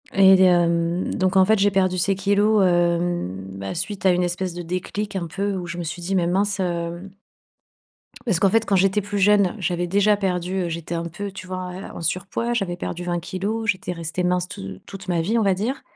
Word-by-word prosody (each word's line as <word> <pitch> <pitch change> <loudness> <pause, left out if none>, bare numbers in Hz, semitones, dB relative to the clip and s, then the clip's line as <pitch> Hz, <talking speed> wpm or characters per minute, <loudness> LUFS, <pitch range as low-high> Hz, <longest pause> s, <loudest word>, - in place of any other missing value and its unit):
Et 190 -1 +7
hem, 170 -1 +2
donc 185 +1 0
en 190 0 +6
fait, 220 0 +3
j'ai 200 +1 +4
perdu 185 -2 +1
ces 195 +2 +1
kilogrammes, 205 +1 +3
hem, 170 - 0
bah, 95 - -5
suite 195 +3 -4
à - - +6
une 180 0 +1
espèce 175 0 -2
de 175 - -5
déclic 195 +4 -4
un 175 -3 -2
peu 200 +4 -2
où 180 -2 -5
je 175 0 -5
me 175 - -3
suis 165 +2 -5
dit: 190 +3 -2
«Mais 175 -2 +2
mince, 200 +2 0
heu» 175 +1 -3 1.2
parce 195 -8 +1
qu'en 195 - +4
fait, 225 +2 +2
quand 200 - +1
j'étais 195 +2 +3
plus 205 +1 -4
jeune, 200 -1 +4
j'avais 175 -2 -1
déjà 205 +3 +3
perdu 185 -1 -1
heu, - - -3
j'étais 165 0 -5
un 170 - -3
peu 195 +4 -5
tu 185 -1 -9
vois, 185 0 -5
heu, 190 +2 -7
en - - -6
surpoids. 190 +8 -2
J'avais 195 -7 -1
perdu 175 0 -5
20 175 -1 -1
kilogrammes, 200 +6 -3
j'étais 185 -2 -1
restée 170 +1 -4
mince 180 0 +1
te 95 -1 -7
toute 195 0 -10
ma 175 -2 +1
vie, 215 +8 0
on - - +3
va 195 -1 +3
dire. 225 +9 -2
185 Hz, 225 wpm, -23 LUFS, 175-195 Hz, 1.2 s, Et